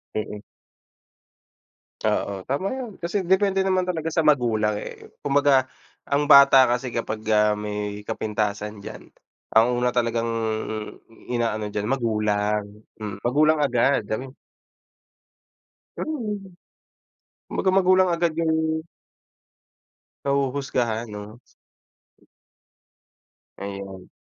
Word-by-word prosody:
Mm. 105 -1 -4 1.6
Oo, 100 -1 -1
tama 145 +8 0
'yan. 255 -4 -5
Kasi 185 +3 -2
depende 190 +1 +2
naman 185 -1 +1
talaga 165 -3 -2
sa 165 -1 0
magulang, 115 -7 +3
eh. - - -10
Kumbaga 140 -2 +3 0.4
ang 145 +1 +2
bata 140 -2 +8
kasi 125 +2 -1
kapag, 115 -2 -3
ah, 105 -1 +4
may 105 0 -4
kapintasan 105 -1 -3
diyan, - - -9 0.5
ang 110 +1 +6
una 125 0 +1
talagang 115 -1 0 1.0
ina-ano 115 -3 -1
diyan, 105 0 -3
magulang. 105 -4 0 0.3
Hmm, 105 -2 -6
magulang 150 +5 +3
agad. 135 -2 +2 1.9
Hmm! 225 -10 -3 1.1
Kumbaga 190 - 0
magulang 185 -1 +5
agad 170 -1 +1
yung 160 -1 +1 1.7
Nahuhusgahan 130 -5 -1
'no? 105 +2 -9 2.2
Ayan. 100 -1 -7
120 Hz, 90 wpm, -24 LUFS, 105-155 Hz, 2.2 s, bata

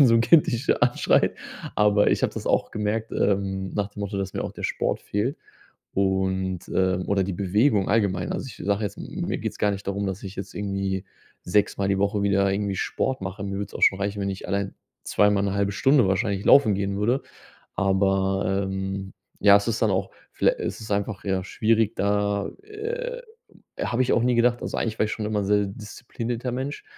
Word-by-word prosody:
wenn 140 - +8
so 115 - +5
'n 115 - +5
Kind 155 +6 +6
dich 120 +5 -2
anschreit. 120 0 +3 0.4
Aber 105 -1 +4
ich - - -1
habe - - +1
das - - -6
auch - - +1
gemerkt, 110 +1 -2
ähm, 95 -1 0
nach 105 -1 -1
dem 105 - -16
Motto, 100 0 -3
dass 95 -1 -3
mir - - -3
auch - - -5
der - - -9
Sport - - -1
fehlt. 115 +9 -1 0.6
Und, 95 -1 0
ähm 95 -1 +1
oder 100 -1 +2
die 95 - -3
Bewegung 100 +3 +2
allgemein. 100 -5 +1
Also, - - -4
ich 105 - -11
sage 100 +1 +1
jetzt, 100 - -3
m - - -6 0.2
mir - - -1
geht's - - -5
gar 105 - +2
nicht 100 0 -5
darum, 100 +1 -2
dass 95 +1 -4
ich 95 0 -7
jetzt 95 0 -7
irgendwie 95 -1 -2 0.4
sechsmal 100 +1 +1
die 100 -1 +1
Woche 100 +1 +1
wieder 100 -1 +2
irgendwie 100 0 -1
Sport 130 +5 -1
mache. 95 +1 -5
Mir 100 - -4
würde 100 +1 -3
es - - -17
auch - - -6
schon 95 - +5
reichen, 100 0 -2
wenn 100 - -1
ich 95 - -6
allein 100 0 -1 0.3
zweimal 105 -1 +2
'ne 100 0 -1
1/2 100 0 0
Stunde 135 +1 +4
wahrscheinlich 100 0 0
laufen 110 -8 +6
gehen 100 0 -2
würde. 120 +6 +1 0.5
Aber, 95 0 +1
ähm, 95 0 -4 0.3
ja, 100 -1 +8
es 100 - 0
ist 110 - -1
dann 110 - +3
auch 95 0 -1 0.2
viellei - - +3
es - - -4
ist 105 - -9
einfach, 100 0 -2
ja, 95 -1 0
schwierig, 110 +2 +1
da, 100 0 0
äh 475 +4 -5 0.6
habe 125 +2 +1
ich 130 - +1
auch 115 - +3
nie 125 0 +2
gedacht. 120 +1 +3
Also, - - -3
eigentlich 110 -1 -2
war - - +3
ich 110 - -5
schon 110 - -3
immer 105 0 -1
'n - - -2
sehr 105 0 +3
disziplinierter 115 +3 -5
Mensch, 135 +3 -4
100 Hz, 215 wpm, -25 LUFS, 95-110 Hz, 0.6 s, wenn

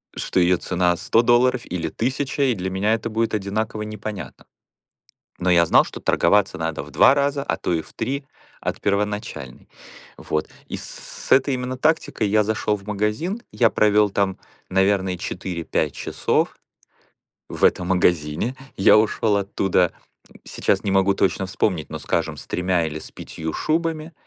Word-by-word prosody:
что - - -1
ее 90 0 +4
цена 90 0 +1
100 100 +5 +2
долларов 120 +1 +3
или 85 -2 -3
1000, 135 - -1
и 130 -3 +2
для 95 -1 -4
меня 100 +4 +1
это 115 +1 -4
будет 115 0 0
одинаково 105 +2 -2
непонятно. 105 -1 -7 1.0
Но 90 0 +1
я 85 -1 +5
знал, - - +6
что - - -9
торговаться 105 -1 +2
надо 80 -3 -3
в 75 - -14
2 - - +6
раза, 140 0 0
а - - -1
то - - -2
и 80 -2 0
в - - -18
3 140 +2 -3 0.4
от - - -3
первоначальной. 105 - -3 0.5
Вот, 75 0 -3 0.2
и - - -4
с - - -9 0.4
с - - -3
этой 135 +1 +4
именно 125 0 -3
тактикой 155 -7 +1
я 105 +1 +3
зашел 105 0 0
в 100 - -15
магазин. 105 - -1
Я 115 -2 +3
провел 105 -1 +3
там, 100 -1 0 0.3
наверное, 95 -1 +1
4-5 85 -5 -3
часов - - -1 0.9
в - - -6
этом 90 - +2
магазине. 90 - +1 0.2
Я 95 - +6
ушел 110 0 +2
оттуда, 95 -3 +1 0.5
сейчас 95 - 0
не 100 - 0
могу 95 0 +3
точно 95 0 +1
вспомнить, 90 -4 -1
но, 80 - -6
скажем, - - -2
с - - -11
3 90 -2 0
или 80 0 -5
с - - -12
5 80 -1 -6
шубами. 160 0 -1
100 Hz, 165 wpm, -22 LUFS, 90-115 Hz, 1.0 s, знал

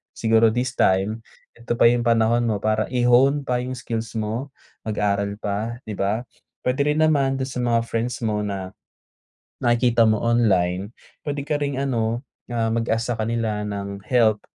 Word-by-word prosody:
Siguro 110 0 +3
this 125 +2 -2
time, 95 +4 +2 0.4
eto 120 0 -3
pa 115 - +4
yung 120 0 +1
panahon 115 +1 +3
mo 105 -3 -1
para 110 0 +1
i-hone 125 +3 +4
pa 125 - 0
yung 125 +1 -4
skills 115 -2 -5
mo, 115 +5 -3 0.3
mag-aral 100 -1 0
pa, 110 +4 -3
'di 105 - -4
ba? 100 +4 0 0.4
Puwede 130 +3 +1
rin 150 +1 +2
naman 140 -4 +2
dun 130 - -2
sa - - -7
mga 115 -1 +2
friends 120 +2 -2
mo 105 -1 0
na, 95 -2 -4 0.9
nakikita 120 -1 +3
mo 110 - +2
online, 95 -5 +2 0.3
puwede 145 -1 -3
ka 150 - 0
ring 140 -2 -1
ano 120 -2 -1 0.3
ah, 115 -2 0
mag-ask 115 +1 0
sa - - -6
kanila 110 -1 -1
ng 100 -1 -5
help, 110 -4 +3
115 Hz, 165 wpm, -23 LUFS, 105-125 Hz, 0.9 s, pa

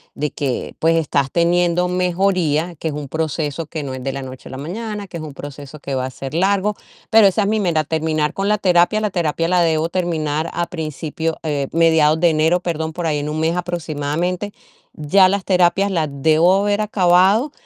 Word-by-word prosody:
de 150 +1 -2
que, 135 -4 -3
pues, 165 +1 +3
estás 140 -4 0
teniendo 175 +1 +2
mejoría, 180 -3 0
que - - -3
es - - -5
un 145 -1 -5
proceso, 155 +1 -3
que 155 -1 -5
no 135 -2 -5
es 130 -1 -7
de 135 - -2
la 135 0 -5
noche 130 0 -10
a - - -10
la 130 - -7
mañana, 205 - -5
que 170 - -7
es 160 - -7
un 150 -2 -8
proceso 145 +1 -9
que 140 - -6
va 130 -1 -1
a - - -6
ser 135 +2 -8
largo", 200 +4 +1 0.4
pero 220 -2 +7
esa 195 +2 +1
es - - 0
mi 215 +1 +1
meta, 170 -6 +1
terminar 155 0 -1
con 195 +1 -1
la 210 - +3
terapia, 180 +2 +3
la 210 -1 -1
terapia 165 -2 -1
la 180 -1 +3
debo 160 -1 +1
terminar 160 -3 -1
a 175 - -1
principio, 160 0 -4
eh, 145 -3 -1
mediados 160 -1 +4
de 170 0 +4
enero, 160 +3 +2
perdón, 160 -3 -3
por 175 +1 -4
ahí 150 -2 0
en 145 +1 -4
1 155 +1 -3
mes 160 +2 +1
aproximadamente, 175 +2 -3 0.4
ya 185 +6 +4
las 200 -1 -1
terapias 185 +2 +2
las 160 -5 0
debo 160 +5 +3
haber 205 +1 +1
acabado 200 +5 +3
165 Hz, 210 wpm, -19 LUFS, 150-180 Hz, 0.4 s, pero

